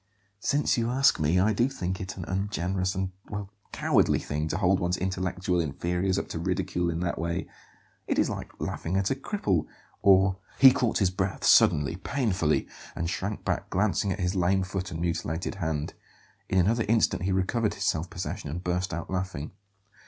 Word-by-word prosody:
"Since 145 +2 +1
you 115 0 0
ask 135 +2 +3
me, 80 +4 +2
I 105 +4 +3
do 120 +5 +2
think 95 -8 -4
it 95 +1 -6
an 90 - -5
ungenerous 95 0 -1
and 95 0 -2 0.2
well 100 -1 -5 0.2
cowardly - - +3
thing 75 +1 -3
to 80 - -2
hold 95 -1 +3
one's 90 0 0
intellectual 95 -1 -1
inferiors 90 +5 -1
up - - -2
to 80 - -4
ridicule 90 -1 -1
in 85 0 -2
that 90 -1 -2
way; 85 +1 -2 0.6
it - - 0
is - - +3
like - - -6
laughing 90 +4 -2
at 95 +3 +1
a - - +2
cripple, 105 - -1 0.3
or 95 -1 +5
" - - -27
He 135 -1 +9
caught 120 -3 +1
his 95 -3 +2
breath 95 +1 -2
suddenly, 75 +3 +5
painfully; 95 - 0 0.3
and 85 +1 -2
shrank 105 +2 -4
back, - - -1
glancing 100 0 +1
at - - -3
his 90 0 0
lame 95 +1 +2
foot 95 0 -4
and 80 - -5
mutilated 85 0 -2
hand. 80 -3 -2 0.6
In 95 - +1
another 110 +6 +3
instant 110 -5 +2
he 95 +2 0
recovered 100 +4 0
his - - -3
self 80 +2 0
possession 90 -3 -5
and 85 +5 -5
burst 90 -1 -1
out 85 - -6
laughing. 95 -6 -3
95 Hz, 190 wpm, -27 LUFS, 85-100 Hz, 0.6 s, He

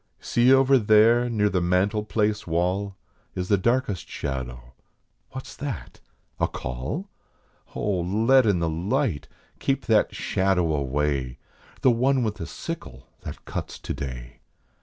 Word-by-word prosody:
See 120 +2 +3
over 135 0 +6
there 115 +3 +5
near 105 -3 +2
the 95 -2 0
mantel 95 +5 +1
place 105 -1 -1
wall 90 +4 0 0.4
Is 90 0 -3
the 100 - +5
darkest 115 - 0
shadow. 60 -3 -5 0.6
What 130 - -7
s - - -11
that 140 -4 -6 0.4
a - - +2
call? 65 - -5 0.7
Oh, 100 -3 0
let 110 +8 +3
in 100 -3 +3
the 85 -1 0
light, 90 - -1 0.3
keep 135 -1 -1
that 110 -3 +2
shadow 90 -4 +1
away, 70 -2 -1 0.4
The 130 - +5
one 130 +2 +2
with 105 -2 -2
the 80 - -5
sickle - - -7
that - - -9
cuts - - -5
today. 65 -4 -6
100 Hz, 140 wpm, -25 LUFS, 80-120 Hz, 0.7 s, over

